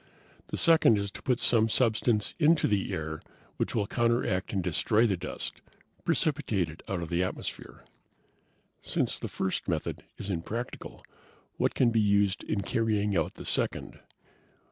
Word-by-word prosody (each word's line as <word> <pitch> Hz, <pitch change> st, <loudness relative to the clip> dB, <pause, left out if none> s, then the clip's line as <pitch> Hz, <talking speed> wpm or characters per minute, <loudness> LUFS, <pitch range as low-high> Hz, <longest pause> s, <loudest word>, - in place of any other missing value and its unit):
The -, -, -4 dB
second 160 Hz, -, +5 dB
is 100 Hz, 0 st, -2 dB
to -, -, -10 dB
put 125 Hz, -2 st, +1 dB
some 115 Hz, -2 st, +3 dB
substance 110 Hz, -2 st, +2 dB
into 160 Hz, +1 st, +4 dB
the 100 Hz, -2 st, 0 dB
air 80 Hz, -1 st, -4 dB, 0.4 s
which -, -, -1 dB
will 105 Hz, -3 st, +1 dB
counteract 115 Hz, -4 st, 0 dB
and 95 Hz, -3 st, -1 dB
destroy 105 Hz, +6 st, +2 dB
the 100 Hz, -4 st, +2 dB
dust, 85 Hz, -, -5 dB, 0.4 s
precipitate 125 Hz, -, 0 dB
it 80 Hz, -, -11 dB
out 90 Hz, -3 st, -2 dB
of 80 Hz, -, -6 dB
the 85 Hz, 0 st, +1 dB
atmosphere." 90 Hz, -, -5 dB, 1.0 s
"Since -, -, 0 dB
the -, -, -4 dB
first 95 Hz, -, -2 dB
method -, -, -2 dB, 0.2 s
is 100 Hz, -, -4 dB
impractical 105 Hz, +8 st, -5 dB, 0.5 s
what -, -, +1 dB
can 120 Hz, -3 st, +4 dB
be 115 Hz, -1 st, +3 dB
used 100 Hz, -1 st, +2 dB
in 100 Hz, -, -1 dB
carrying 105 Hz, -2 st, 0 dB
out 80 Hz, -3 st, 0 dB
the -, -, -9 dB
second?" -, -, -1 dB
105 Hz, 155 wpm, -29 LUFS, 95-115 Hz, 1.0 s, second